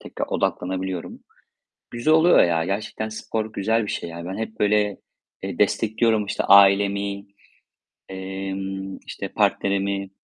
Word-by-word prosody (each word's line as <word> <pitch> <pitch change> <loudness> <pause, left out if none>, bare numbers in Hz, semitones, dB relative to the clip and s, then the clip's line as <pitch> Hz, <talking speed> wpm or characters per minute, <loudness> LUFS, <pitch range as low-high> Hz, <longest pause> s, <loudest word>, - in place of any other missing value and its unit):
tekrar - - -5
odaklanabiliyorum. 95 -1 -3 0.7
Güzel 135 +7 +2
oluyor 170 +2 +6
ya. 85 -1 +1
Gerçekten 105 +3 -3
spor 110 0 -4
güzel 110 +3 +1
bir - - -4
şey 85 - -4
ya. 85 0 -8
Ben 95 +3 -5
hep 110 0 -6
böyle, 105 -1 +2 0.4
eee, - - -5
destekliyorum 110 -1 +1
işte 105 - -2
ailemi, 100 0 +4 0.8
emm, 95 0 -5
işte - - -6
partnerimi. 100 0 0
100 Hz, 125 wpm, -23 LUFS, 95-110 Hz, 0.8 s, oluyor